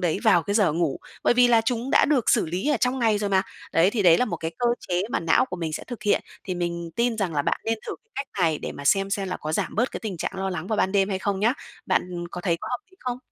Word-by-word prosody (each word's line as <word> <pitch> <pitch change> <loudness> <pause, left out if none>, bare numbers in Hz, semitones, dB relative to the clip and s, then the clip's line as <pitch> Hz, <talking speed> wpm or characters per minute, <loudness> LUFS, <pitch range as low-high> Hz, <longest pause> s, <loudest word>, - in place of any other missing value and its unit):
đấy 175 -1 0
vào 185 -6 +5
cái 200 - -2
giờ 205 -7 +3
ngủ. 165 -2 0 0.3
Bởi - - +4
vì 245 0 +5
là 230 -1 +5
chúng 240 +2 -2
đã - - +5
được 280 -6 +2
xử - - +3
lý 180 - -2
ở 295 - +3
trong 250 +3 0
ngày 220 -3 +2
rồi 205 -1 -2
mà. 190 -1 +3 0.3
Đấy, 170 +4 +4
thì 215 -1 0
đấy 170 -3 +6
là 250 - +3
một 220 - -3
cái 160 - -4
cơ 245 - +1 0.2
chế 180 0 +1
mà - - 0
não 165 +8 +3
của 180 - -6
mình 165 -3 -3
sẽ - - -4
thực 245 -4 -8
hiện. 210 - +2 0.2
Thì 185 - -3
mình 170 -1 -3
tin 235 -1 +1
rằng 185 -6 -1
là 145 - +1
bạn - - 0
nên 225 0 0
thử - - -3
cái 445 - -44
cách 275 - -4
này 160 -3 +2
để - - -5
mà 140 - -9
xem 195 +6 +3
xem 195 -1 -1
là - - -2
có 155 - -5
giảm - - -1
bớt 235 +4 +1
cái - - -6
tình 210 -5 -4
trạng - - -3
lo 190 0 -2
lắng 175 -2 -4
vào 215 - -1
ban 190 - +1
đêm 195 -1 +3
hay 190 -2 -1
không 195 0 -2
nhá. 225 +4 +4 0.3
Bạn 175 -1 -1
có 175 - -6
thấy 175 -2 +1
có - - -5
hợp 250 - -1
lý 375 - -23
không? 250 -1 -3
195 Hz, 315 wpm, -25 LUFS, 175-230 Hz, 0.3 s, đấy